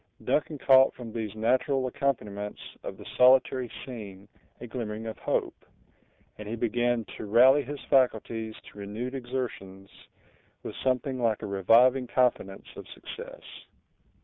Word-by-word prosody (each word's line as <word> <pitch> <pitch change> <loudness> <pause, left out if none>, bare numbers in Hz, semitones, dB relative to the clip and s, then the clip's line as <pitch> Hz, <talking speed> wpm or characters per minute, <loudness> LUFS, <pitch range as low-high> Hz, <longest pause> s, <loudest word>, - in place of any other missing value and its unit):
Duncan 150 0 0
caught 135 -1 +5
from 115 -3 -9
these 110 -3 -4
natural 130 +4 +1
accompaniments 105 -6 -2 0.2
of - - -7
the - - -12
solitary 130 -1 +5 0.2
scene 100 -6 -9 0.3
a 120 - -7
glimmering 110 -2 -5
of 110 - -6
hope; - - -2 0.8
and 105 -1 -7
he 115 - -2
began 120 0 0
to - - -6
rally 130 +7 +6
his 145 +1 -7
faculties 115 -4 +1 0.2
to 105 - -14
renewed 110 +6 -5
exertions, 120 -7 -5 0.7
with - - -6
something 130 0 -1
like 115 -3 0
a - - -2
reviving 120 +7 +4
confidence 120 -6 0
of - - -10
success. - - -10
120 Hz, 135 wpm, -28 LUFS, 105-130 Hz, 0.8 s, rally